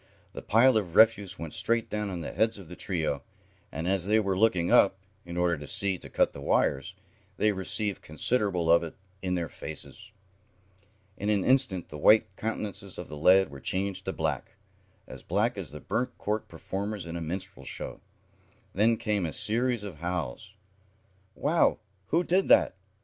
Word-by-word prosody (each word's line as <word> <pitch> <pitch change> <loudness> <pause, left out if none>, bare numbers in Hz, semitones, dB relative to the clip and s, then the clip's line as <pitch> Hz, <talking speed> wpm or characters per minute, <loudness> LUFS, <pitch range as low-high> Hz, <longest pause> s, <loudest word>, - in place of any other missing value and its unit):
The - - -7
pile 120 +2 +4
of 90 -6 -3
refuse 105 -4 +4
went 80 -2 -6
straight 115 0 0
down 105 -2 -3
on 90 -3 -4
the - - -5
heads 110 0 +1
of 95 -5 -12
the 90 - -8
trio, 80 -8 -2 0.5
and, 80 +4 -4
as 95 -1 +1
they 110 +2 +4
were 100 -3 0
looking 90 -4 +2
up, 95 -1 +5 0.3
in 85 0 -6
order 85 -2 +1
to 75 - -8
see 95 +2 +1
to - - -10
cut - - +2
the 70 - -9
wires, - - 0 0.4
they 105 - +3
received 100 +1 -1
considerable 90 - +1
of 85 - +6
it 85 -2 -7 0.3
in 90 -1 -1
their 85 -2 -2
faces. 110 +7 -9 1.1
In 105 - -2
an 100 -3 +1
instant 125 -9 +3
the 75 - -8
white 100 +3 +5
countenances 105 -3 -4
of 90 - -7
the 75 - -7
lads 90 +3 +4
were 70 - -9
changed 95 +5 -2
to - - -1
black - - -3 0.5
as - - -10
black - - 0
as - - -5
the 75 - -8
burnt 125 +8 -2
cork 105 +1 -2
performers 100 +3 -5
in 85 0 -6
a 85 - -4
minstrel 95 0 -5
show. - - -7 0.7
Then 110 +4 +3
came 105 -3 -1
a 80 - -2
series 120 - 0
of 95 -7 -8
howls. 85 -7 -4 0.8
"Wow! 160 +4 +2 0.3
Who 170 +3 +2
did 185 +2 +2
that!" - - +5
95 Hz, 180 wpm, -28 LUFS, 85-110 Hz, 1.1 s, of